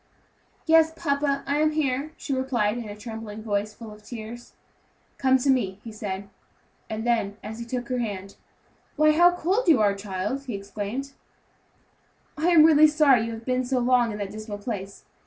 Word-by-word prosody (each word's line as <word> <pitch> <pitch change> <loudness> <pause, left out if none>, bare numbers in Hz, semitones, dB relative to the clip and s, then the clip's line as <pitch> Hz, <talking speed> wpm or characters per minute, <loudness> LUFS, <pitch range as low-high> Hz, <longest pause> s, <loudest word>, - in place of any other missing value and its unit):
"Yes, 320 -1 +5
papa, 280 -1 0
I 285 +2 0
am 310 0 +2
here," 290 0 -1
she 280 - -4
replied 245 -5 0
in 225 -3 -7
a 205 - -7
trembling 220 -1 -7
voice, 210 -1 -2
full 225 -2 -10
of 210 0 -13
tears. 235 +2 -9 0.7
"Come 265 -1 +4
to 270 +2 +2
me," 200 -7 0
he 230 - -8
said; 200 -2 -5 0.6
and 220 +1 -4
then, 220 -4 0
as 220 +2 -7
he 235 - -5
took 245 0 -4
her 250 -1 -1
hand, 200 -4 -5 0.6
"Why, 305 0 +5
how 345 +3 +6
cold 375 +7 0
you 310 -8 +6
are, 205 -2 +3
child," 200 +7 -4
he 245 -5 -4
exclaimed; 205 +7 -5 1.2
"I 315 +2 -1
am 340 -3 +7
really 310 -1 +7
sorry 285 -7 +4
you 230 - -4
have 225 0 -9
been 255 0 0
so 255 +1 -1
long 245 -1 +3
in 210 - -5
that 200 -2 -4
dismal 215 -1 -7
place. 200 -2 -6
240 Hz, 185 wpm, -25 LUFS, 210-280 Hz, 1.2 s, am